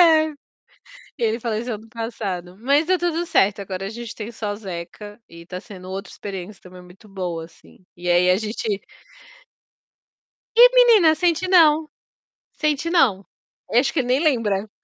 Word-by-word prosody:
É. 315 -2 +5
E 300 - -14 0.8
ele 230 0 0
faleceu 230 0 -3
ano 220 +2 -13
passado, 200 -6 -5
mas 280 +7 +2
deu 370 - +3
tudo 345 -1 -1
certo, 205 - +2
agora 195 -1 -5
a - - -4
gente 235 0 -8
tem 220 +1 -7
só 210 -2 -4
Zeca, 205 +2 -8
e 170 0 -12
está 180 +1 -7
sendo 190 -4 -12
outra 195 +1 -6
experiência 195 0 -8
também 180 0 -13
muito 180 +4 -17
boa, 175 -4 -5
assim, 170 +2 -21
e 175 0 -5
aí 175 +1 +4
a 185 - +4
gente 215 -1 -3 1.8
E - - +10
menina, 445 -11 +6
sente 355 +1 +1
não, 315 -4 +5 0.6
sente 305 +1 -1
não. 220 - +2 0.5
Acho 245 +4 +3
que 310 - 0
ele 245 - -1
nem 255 - +3
lembra. 220 - 0
220 Hz, 160 wpm, -22 LUFS, 190-305 Hz, 1.8 s, E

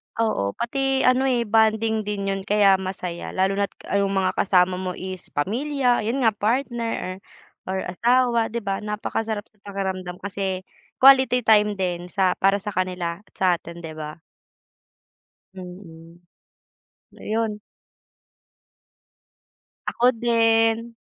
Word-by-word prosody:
Oo. 100 - 0
Pati 270 +2 0
ano 255 +1 +3
eh, 245 -2 +2
bonding 220 0 +2
din 200 -1 -2
'yun 195 - -2
kaya 200 -2 +4
masaya. 185 -2 -5
Lalo 195 +2 +1
na't 200 - -1 0.3
'yung 200 0 +1
mga 190 -1 +1
kasama 185 -1 +3
mo 185 -1 -4
is 185 -1 -7
pamilya, 250 - +1
'yun 250 +3 -1
nga 225 - +5
partner, 230 -3 -2 0.5
or 190 0 -2
asawa, 235 +4 +2
'di 235 +1 -4
ba 195 -1 -2
napakasarap 210 0 -3
sa 210 -2 -35
pakiramdam, 190 -2 -4
kasi 190 -2 -3 0.4
quality 260 -2 +6
time 210 -2 +4
din 180 -2 -3
sa 185 -1 +1
para 195 +1 +3
sa 210 - -4
kanila 180 -2 -2
at 210 - -27
sa 190 - 0
atin 170 0 -11
'di 160 -1 -7
ba. 155 0 -7 1.4
Mm. 175 -2 -11 0.9
So - - -16
'yon. 220 -1 -2 2.3
Ako 240 - 0
din. 230 0 +2
205 Hz, 130 wpm, -23 LUFS, 185-230 Hz, 2.3 s, quality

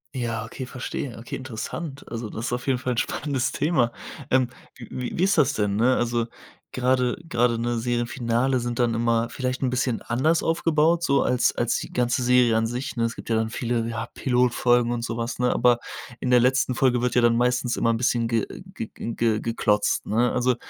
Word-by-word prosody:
Ja, 115 -3 -2
okay, 120 +3 -7
verstehe. 130 0 -5
Okay, 115 - -6
interessant. 135 +4 -6
Also, 115 -1 -4
das 115 - -5
ist - - -2
auf 125 0 -3
jeden 130 -2 +1
Fall 125 0 -1
'n - - -6
spannendes 130 0 -1
Thema. 145 -7 +1 0.4
Ähm, 130 -1 +3 0.3
wie 125 +1 -6
wie 175 - +1
ist 195 0 +3
das 145 -2 +4
denn, 105 -4 0
ne, 125 +4 +3
also 120 -1 0 0.5
grade 125 -1 +1
grade, 120 -5 +1
ne, 120 0 -1
Serienfinale 120 +1 0
sind 120 0 -3
dann 120 -2 +2
immer 115 0 +1
vielleicht 130 -1 -3
'n 130 - +1
bisschen 125 -2 -1
anders 150 +8 +1
aufgebaut 165 0 +2
so 140 -4 +3
als 125 -1 +2
als 120 -1 +1
die - - -6
ganze 125 0 +1
Serie 125 -2 +4
an 110 - +1
sich, 125 +4 -4
ne? 115 - 0
Es 115 0 -3
gibt - - -10
ja 115 - +2
dann 110 0 0
viele, 120 -1 -1
ja, 115 0 -4
Pilotfolgen 120 -1 +2
und 120 -1 -2
so 115 -1 -3
was, 115 0 -3
ne? 125 0 +2
Aber 120 0 +4 0.4
in 130 - -2
der 125 - +7
letzten 130 +1 +2
Folge 125 -1 +2
wird 125 - +1
ja 125 - +5
dann 120 0 +4
meistens 125 0 +1
immer 115 - +2
'n 115 - 0
bisschen 120 -1 +1
ge 115 -2 0 0.3
ge 110 - -5
ge 115 - -4
ge 115 -2 +1
geklotzt, 105 -2 +1
ne? 120 +3 +2
Also, 125 0 +1
120 Hz, 210 wpm, -24 LUFS, 115-130 Hz, 0.5 s, der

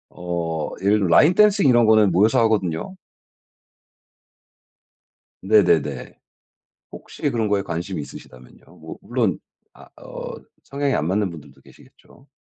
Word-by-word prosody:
어 85 -3 -4
예를 105 +2 +3
들어 95 - 0
라인 150 - +5
댄싱 205 -6 +3
이런 120 -3 +4
거는 110 -3 +4
모여서 105 +6 +2
하거든요. 100 - -1 2.5
네네네. 85 - +1 0.7
혹시 - - -5
그런 115 -2 -2
거에 100 -1 +1
관심이 85 0 -5
있으시다면요. 65 -3 -14
뭐 - - -11
물론 - - -2 0.3
아 - - -17
어 - - -8 0.3
성향이 140 0 -3
안 75 - -1
맞는 100 +1 0
분들도 75 -3 -14
계시겠죠. - - -21
100 Hz, 270 characters per minute, -21 LUFS, 85-110 Hz, 2.5 s, 라인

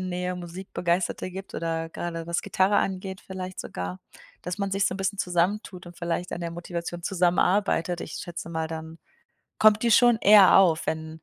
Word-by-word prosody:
Nähe 180 0 -3
Musikbegeisterte 180 0 -3
gibt 190 +1 -8
oder 165 0 -3
grade 165 -1 -5
was 170 0 -1
Gitarre 190 +2 +2
angeht, 190 0 -2
vielleicht 185 -1 -7
sogar, 90 +1 -6 0.4
dass 180 +1 -4
man 200 -1 -1
sich 195 +1 +1
so - - -1
'n - - -5
bisschen 195 +1 -2
zusammen 180 +4 +1
tut 180 -1 -11
und 175 - -12
vielleicht 170 +1 -3
an - - -4
der 170 -1 -3
Motivation 175 0 -6
zusammenarbeitet. 180 -1 +1
Ich - - -7
schätze 170 -1 -6
mal 160 -1 -2
dann 160 0 -7 0.6
kommt 215 0 +5
die 235 - +2
schon 240 0 +6
eher 205 -3 +8
auf, 170 -5 +3
wenn 160 0 -4
180 Hz, 180 wpm, -26 LUFS, 170-190 Hz, 0.6 s, eher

